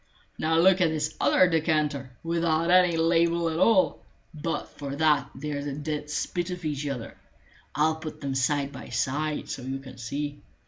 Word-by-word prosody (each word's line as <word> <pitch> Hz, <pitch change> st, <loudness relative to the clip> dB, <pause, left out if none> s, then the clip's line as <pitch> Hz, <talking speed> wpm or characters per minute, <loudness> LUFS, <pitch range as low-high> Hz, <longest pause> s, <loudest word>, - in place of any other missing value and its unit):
Now 160 Hz, +1 st, +2 dB
look 185 Hz, +2 st, +5 dB
at 170 Hz, -, +4 dB
this 155 Hz, -1 st, -2 dB
other 185 Hz, -, +5 dB
decanter, 155 Hz, -5 st, 0 dB
without 165 Hz, 0 st, +1 dB
any 180 Hz, -2 st, +5 dB
label 170 Hz, +1 st, +2 dB
at 160 Hz, -, -2 dB
all; 195 Hz, -3 st, +4 dB, 0.3 s
but 165 Hz, +2 st, -3 dB
for 140 Hz, -1 st, -6 dB
that 150 Hz, -3 st, +2 dB
they're 145 Hz, 0 st, -4 dB
the 145 Hz, -1 st, -4 dB
dead 150 Hz, 0 st, -4 dB
spit 175 Hz, +3 st, -2 dB
of 180 Hz, -2 st, -6 dB
each 150 Hz, -1 st, -2 dB
other. 125 Hz, -5 st, -5 dB, 0.6 s
I'll 155 Hz, +2 st, +2 dB
put 160 Hz, -1 st, -7 dB
them 140 Hz, -2 st, -3 dB
side 140 Hz, +1 st, 0 dB
by 135 Hz, -, -9 dB
side, 150 Hz, +3 st, -1 dB
so -, -, -5 dB
you 130 Hz, +2 st, -4 dB
can 130 Hz, -2 st, -12 dB
see. 145 Hz, +5 st, -4 dB
155 Hz, 175 wpm, -27 LUFS, 140-165 Hz, 0.6 s, look